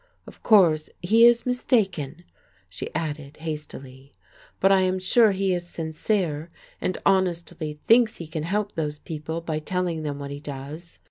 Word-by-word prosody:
Of - - -14
course 170 -8 +4
he 225 +6 +6
is 240 0 +5
mistaken," 190 - 0 0.4
she 90 -2 -7
added 150 -3 -4
hastily, 140 -4 -8 0.5
"but 195 - +4
I 190 -1 +5
am 185 0 +1
sure 210 +4 +4
he 195 -1 0
is 175 -1 -3
sincere, 160 -1 -2 0.3
and 185 - -1
honestly 170 -5 0
thinks 230 -1 +4
he 170 - -7
can 155 0 -5
help 205 +5 -1
those 150 -4 -3
people 160 +2 -5
by 160 -2 -3
telling 175 0 -2
them 145 -2 -3
what 140 0 -6
he 140 - -6
does." 145 +4 -8
165 Hz, 155 wpm, -25 LUFS, 150-190 Hz, 0.5 s, he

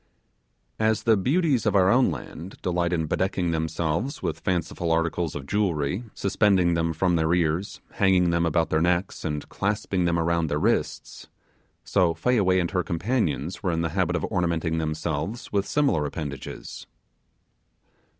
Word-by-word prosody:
As 110 0 +1
the 115 -1 +4
beauties 135 - +1
of - - +1
our 95 -1 +5
own 125 +1 +4
land 90 +5 -7
delight 90 -1 0
in 80 -3 0
bedecking 95 0 0
themselves 80 - -2
with - - -2
fanciful 85 -2 -1
articles 85 0 0
of 70 -2 -5
jewellery, 95 - -1
suspending 95 -3 +2
them 85 0 0
from 85 +2 +1
their 80 0 +1
ears, 85 +3 -1
hanging 95 -3 +3
them 85 0 +1
about 85 0 +1
their 80 - +2
necks, 90 +2 0
and 75 -1 -3
clasping 100 -2 -1
them 85 0 +1
around 85 0 +1
their 75 - -1
wrists; 105 +9 -1 0.6
so 90 -4 +2
Fayaway 95 -1 +2
and 85 -1 -1
her 90 -2 +1
companions 90 - -1
were 90 - 0
in 85 0 -1
the 80 - 0
habit 90 -2 0
of - - -1
ornamenting 85 -4 -1
themselves 80 +6 -3
with 100 -1 0
similar 140 - +2
appendages. 70 -3 -7
85 Hz, 155 wpm, -25 LUFS, 80-100 Hz, 0.6 s, our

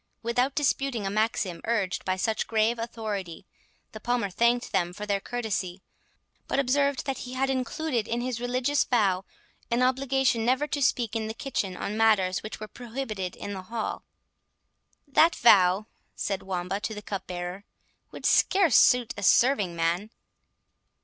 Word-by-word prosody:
Without 245 +4 0
disputing 275 -6 0
a 195 - -1
maxim 215 -4 -1
urged 210 -6 -1
by 185 - +1
such 220 +4 -1
grave 225 +1 +1
authority, 210 -7 -5 0.5
the 215 - -9
Palmer 235 -4 -1
thanked 235 +5 +1
them 175 -1 0
for 210 +3 -6
their 200 -1 0
courtesy, 195 -5 -3 0.6
but - - -1
observed 280 +1 +1
that 270 -2 -3
he 250 - -7
had 270 +1 0
included 260 -1 -2
in 235 - -1
his 245 -1 -3
religious 255 +3 +1
vow, 195 -6 +1 0.5
an 240 +2 +2
obligation 260 -2 +1
never 255 +5 +2
to 290 -1 -3
speak 240 -4 +1
in 220 -1 -1
the 220 - -5
kitchen 195 -9 -3
on 205 - -4
matters 200 -5 +3
which 215 - -7
were 215 - -6
prohibited 225 -6 -5
in 205 - -6
the 190 - -5
hall. 220 +4 -4 1.0
"That 325 +4 +4
vow," 195 -3 +5 0.3
said 195 -2 -2
Wamba 185 +1 -3
to 220 +1 -4
the 210 - -8
cupbearer, 180 -1 -5 0.5
"would - - -9
scarce 375 - +4
suit 245 -2 +4
a - - -5
serving 205 -4 +3
man." 170 +5 0
225 Hz, 155 wpm, -27 LUFS, 195-250 Hz, 1.0 s, vow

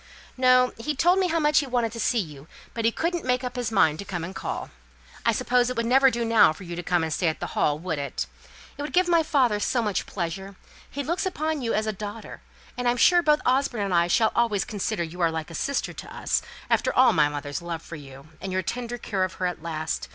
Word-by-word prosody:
"No, 255 -1 +4
he 295 +6 -2
told 350 +7 +4
me 375 - +2
how 330 -1 +1
much 300 -1 +4
he 280 - -2
wanted 240 -3 0
to 230 - -7
see 240 - +1
you, 150 -8 -4 0.3
but 230 -1 -2
he 230 - +4
couldn't 340 +6 -2
make 250 0 0
up 250 0 -4
his 245 -3 -2
mind 160 -7 +3
to - - -4
come 175 -4 -4
and 175 +3 -6
call. - - -5 0.6
I - - +6
suppose 245 0 +2
it 250 - -4
would 230 - 0
never 265 +3 +5
do 235 -1 -2
now 225 -8 +5
for 170 - -12
you 170 -1 -6
to 175 - -4
come 175 -1 +1
and 160 -1 -2
stay 180 - 0
at 160 - -1
the - - -5
Hall, 145 -1 +1
would 160 -2 -3
it? 140 -2 -3 0.5
It - - -3
would 295 - -5
give 365 0 +4
my 340 -1 +4
father 260 -9 +2
so 240 +3 0
much 210 -3 -1
pleasure: 190 +2 -4 0.3
he 285 - -4
looks 340 +6 -1
upon 315 -4 -2
you 230 -2 -1
as 215 - 0
a 215 - -1
daughter, 210 +2 -8 0.3
and 245 -1 -2
I'm 240 0 +2
sure 350 +8 +6
both 300 -2 +3
Osborne 255 -4 +1
and 195 -2 -2
I 170 0 +4
shall 220 +5 +3
always 230 -4 +1
consider 210 -2 -2
you 170 +2 -7
are 165 - +4
like 160 0 -5
a - - -9
sister 280 - -2
to - - -9
us, - - -1 0.3
after - - +2
all 255 0 +5
my 150 -2 +4
mother's 145 0 -5
love 170 -1 -5
for 170 - -8
you, 140 0 -12
and 195 - -4
your 185 0 0
tender 240 +5 -4
care 200 -5 -2
of 185 - -2
her 185 - -3
at 180 -3 -3
last. 160 -1 -3
220 Hz, 260 wpm, -25 LUFS, 170-255 Hz, 0.6 s, I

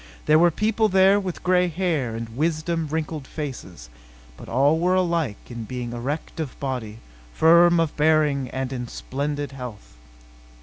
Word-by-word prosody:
There 155 +1 +5
were 175 +1 +6
people 215 +5 +1
there 190 +1 +5
with 185 -3 -5
gray 180 0 +3
hair 160 -9 -1
and 115 0 -5
wisdom 160 +2 -1
wrinkled 155 -2 -4
faces; 125 - -7 0.5
but - - -12
all 140 +6 +3
were 180 +2 +2
alike 170 - 0
in 120 -1 -6
being 120 0 -5
erect 140 +8 -5
of 150 -5 -5
body, 125 -6 -4 0.4
firm 170 +1 +6
of 165 -2 0
bearing 150 -4 +2
and 130 0 -4
in 125 -2 -4
splendid 145 +4 -4
health. 125 - -9
150 Hz, 150 wpm, -23 LUFS, 130-170 Hz, 0.5 s, were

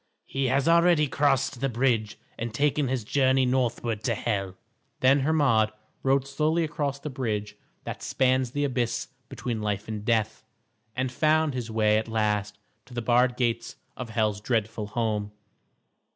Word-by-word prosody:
"He 135 0 -2
has 135 +3 +1
already 170 -2 +5
crossed 135 -2 +1
the 135 - +1
bridge 115 -3 0 0.2
and 115 0 -4
taken 145 +3 +1
his 125 -2 -1
journey 130 +2 +2
northward 120 -3 0
to 115 -3 +1
Hel." 100 -4 -2 0.5
Then 135 +2 +5
Hermod 135 -7 +3 0.3
rode 135 0 +2
slowly 155 +4 +1
across 150 -3 -2
the 145 +1 -6
bridge 105 -6 -3 0.3
that - - -6
spans 130 -1 +1
the 145 +4 -2
abyss 125 -4 -1 0.2
between 115 -3 -4
life 105 -1 -2
and 105 -2 -5
death, 110 -1 0 0.5
and 130 0 -1
found 155 +2 +2
his 125 -3 -4
way 110 -1 +3
at 110 - -5
last 105 -2 -1 0.3
to 125 - -12
the 120 - -1
barred 125 +1 +3
gates 115 -2 -1 0.2
of 125 -2 -6
Hel's 110 -2 0
dreadful 110 -2 -1
home. 105 -2 -2
125 Hz, 155 wpm, -26 LUFS, 110-135 Hz, 0.5 s, already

